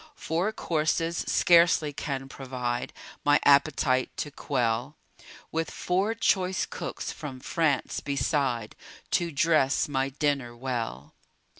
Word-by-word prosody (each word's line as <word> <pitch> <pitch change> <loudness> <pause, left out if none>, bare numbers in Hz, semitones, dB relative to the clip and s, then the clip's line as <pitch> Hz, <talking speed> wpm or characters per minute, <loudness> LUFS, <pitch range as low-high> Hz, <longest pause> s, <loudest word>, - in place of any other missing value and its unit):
Four 175 +6 -1
courses 165 -2 0
scarcely 170 -4 +4
can 135 -2 -4
provide 125 -3 -4 0.3
My 145 +1 +5
appetite 140 -2 +4
to 145 - -3
quell; 125 0 -1 0.5
With 165 0 -1
four 195 +5 0
choice 190 -4 +1
cooks - - -5
from 140 -4 -7
France 150 0 0
beside, 140 -5 -1 0.4
To 175 -1 +1
dress 150 -2 +2
my 135 -2 0
dinner 140 -4 -1
well. 115 - -4
145 Hz, 110 wpm, -27 LUFS, 130-165 Hz, 0.5 s, My